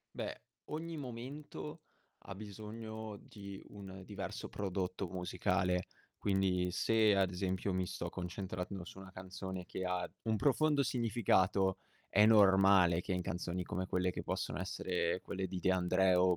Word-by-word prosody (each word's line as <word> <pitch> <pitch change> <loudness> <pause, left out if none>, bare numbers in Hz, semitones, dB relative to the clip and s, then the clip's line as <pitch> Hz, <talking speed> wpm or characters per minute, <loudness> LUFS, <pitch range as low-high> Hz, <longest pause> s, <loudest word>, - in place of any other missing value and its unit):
Beh, - - -4 0.3
ogni 165 +2 -3
momento 125 - -6 0.4
ha 95 - -6
bisogno 110 +1 -7
di 100 -2 -8
un 95 -2 -9
diverso 100 0 -5
prodotto 95 -1 -2
musicale. 90 0 0 0.3
Quindi 95 -2 +2
se, 110 +2 +4
ad 95 -2 +3
esempio, 95 +1 -1
mi 90 0 0
sto - - -4
concentrando 90 +1 -4
su 95 - -11
una 95 0 -10
canzone 95 0 -6
che 95 - -4
ha 90 -1 -1
un 110 -1 +1
profondo 145 +4 +3
significato, 100 -6 +2 0.3
è 105 +2 +6
normale 95 -4 +6
che 95 - -2
in 90 0 0
canzoni 90 -1 -2
come 95 +2 -3
quelle 90 0 +1
che - - -4
possono 75 - -2
essere 90 -1 -1
quelle 95 -1 -3
di 90 0 -4
De 95 - +3
André 95 0 +4
o 90 0 +5
95 Hz, 145 wpm, -35 LUFS, 90-105 Hz, 0.4 s, è